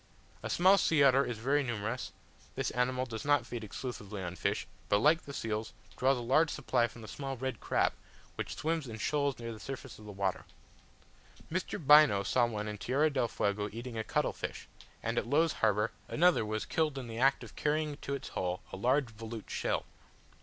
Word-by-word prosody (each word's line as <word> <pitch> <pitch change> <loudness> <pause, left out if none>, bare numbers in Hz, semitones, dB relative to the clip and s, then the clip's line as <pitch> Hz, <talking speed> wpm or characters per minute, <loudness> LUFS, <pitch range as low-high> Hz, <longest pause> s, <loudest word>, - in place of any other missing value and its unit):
A - - -4
small 190 +3 +5
sea 155 -4 +4
otter 135 0 +6
is 120 -4 -3
very 135 +6 +2
numerous; 120 -1 -3 0.4
this - - -1
animal 125 +1 0
does 115 -3 -6
not 145 -4 +3
feed 120 -2 -5
exclusively 105 -3 -6
on 90 0 -4
fish, - - -1 0.2
but, 100 - +5
like 155 +9 +4
the 140 - -9
seals, 110 -4 -3 0.2
draws 130 +1 +3
a - - -4
large 140 +7 +3
supply 125 -5 +1
from 115 -1 -12
a - - -8
small 135 +1 -5
red 130 +2 -3
crab, - - +1 0.4
which - - -5
swims 160 -2 -1
in 110 -2 -6
shoals 140 +4 0
near 115 -1 -5
the 110 - -10
surface 130 -1 -7
of 105 - -12
the 105 - -7
water. 95 -1 -2 1.1
Mr. 185 +2 -2
Bynoe 150 -8 +6
saw 120 -2 +3
one 105 -2 -4
in 105 -1 -5
Tierra 145 +8 +2
del 130 -4 +1
Fuego 105 -1 -1
eating 120 +2 -6
a 110 - -2
cuttle - - 0
fish; - - -6 0.4
and - - +1
at - - -5
Low's 155 +5 +3
Harbour, 105 0 +1 0.2
another 175 -6 +4
was 110 0 -2
killed 155 -3 0
in 130 - -4
the 115 0 -6
act 135 +2 +3
of - - -11
carrying 150 -1 0
to 140 - -3
its 135 - -7
hole 90 +3 -2
a - - -4
large 125 +4 +2
volute 110 0 -7
shell. - - -1
125 Hz, 205 wpm, -32 LUFS, 110-145 Hz, 1.1 s, otter